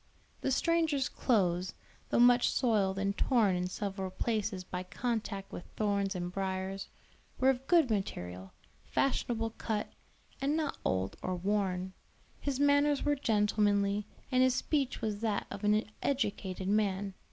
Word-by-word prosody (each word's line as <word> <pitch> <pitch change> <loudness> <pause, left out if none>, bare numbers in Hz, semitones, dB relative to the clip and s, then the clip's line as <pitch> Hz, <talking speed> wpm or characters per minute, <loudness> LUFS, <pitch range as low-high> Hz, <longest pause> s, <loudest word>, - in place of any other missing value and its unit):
The - - 0
stranger's 315 -1 +2
clothes, 185 -6 +1 0.3
though - - +1
much 245 0 +6
soiled 205 -6 +1
and 200 0 0
torn 220 -8 +3
in 180 0 -1
several 195 0 -3
places 210 -2 -2
by 180 0 -5
contact 205 0 -3
with - - -7
thorns 200 -2 0
and 175 0 -3
briers, 190 0 -3 0.5
were 265 +1 +5
of 265 +1 -6
good 330 -9 +4
material, 95 - -3 0.3
fashionable 230 -4 0
cut, 215 -2 -2 0.5
and 285 +3 +1
not 310 -3 -2
old 95 +1 -1
or 185 - -2
worn; 190 -1 -1 0.5
his 275 -2 -2
manners 285 0 +4
were 290 - +3
gentlemanly, 210 -4 +1 0.2
and 255 0 +4
his 255 -1 +4
speech 275 -3 0
was 215 -2 -2
that 215 -3 0
of 200 +1 -6
an 210 +1 +3 0.2
educated 200 -8 -1
man. 200 -1 +1
210 Hz, 140 wpm, -32 LUFS, 190-250 Hz, 0.5 s, much